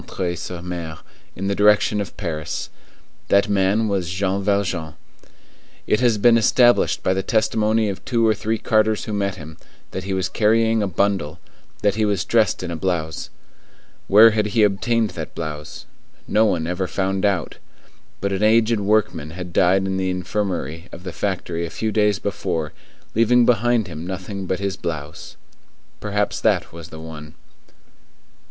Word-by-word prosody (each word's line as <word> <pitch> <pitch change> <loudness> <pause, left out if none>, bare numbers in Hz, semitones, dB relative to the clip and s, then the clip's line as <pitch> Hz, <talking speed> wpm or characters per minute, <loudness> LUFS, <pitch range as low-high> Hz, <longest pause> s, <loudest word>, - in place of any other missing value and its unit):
sur 90 +1 -6
M. 85 -2 -6 0.4
in 95 - -5
the 100 - 0
direction 105 +1 +3
of 100 - -7
Paris. 80 -6 -4 0.6
That 100 +1 +3
man 100 +2 +2
was 95 -4 -1
Jean 95 +2 -1
Valjean. 95 -6 -1 0.9
It 105 - +2
has 120 -3 +3
been 115 +2 +5
established 120 +2 +3
by 95 - +2
the 95 - -1
testimony 110 +1 +1
of 95 -2 -5
two 115 -2 +1
or 110 - +4
three 110 +2 -2
carters 110 0 +1
who 110 - -4
met 100 -1 -1
him, 80 +1 -11 0.3
that 95 - -5
he 95 -1 -2
was 95 0 0
carrying 110 +1 +2
a 100 - 0
bundle; 95 -4 -1 0.5
that 100 -1 +3
he 110 +1 0
was 100 -4 0
dressed 110 -5 +2
in 90 - -4
a - - -3
blouse. 80 -3 -2 0.8
Where 110 +3 +8
had 105 -1 0
he 110 +1 +2
obtained 110 +2 +1
that 80 -3 -7
blouse? 75 -2 -6 0.4
No 110 +1 +3
one 85 -6 0
ever 90 +2 -2
found 95 0 -1
out. 95 -6 0 0.6
But 100 +1 -1
an 95 0 -2
aged 110 +1 +3
workman 105 -6 0
had 90 +1 -8
died 95 +2 +3
in 95 0 -1
the 95 0 -1
infirmary 90 -3 -3
of 90 - -10
the 90 -2 -6
factory 90 -4 -2
a 85 - -4
few 110 +5 -3
days 105 -2 +2
before, 85 -6 -3 0.4
leaving 120 +2 +4
behind 120 -1 +2
him 85 -1 -7
nothing 95 +1 -5
but 95 - -1
his 100 -1 -2
blouse. 75 -3 -6 0.6
Perhaps 105 0 -1
that - - +1
was 85 -1 -10
the 80 - -10
one. 80 -1 -10
100 Hz, 165 wpm, -21 LUFS, 90-105 Hz, 0.9 s, Where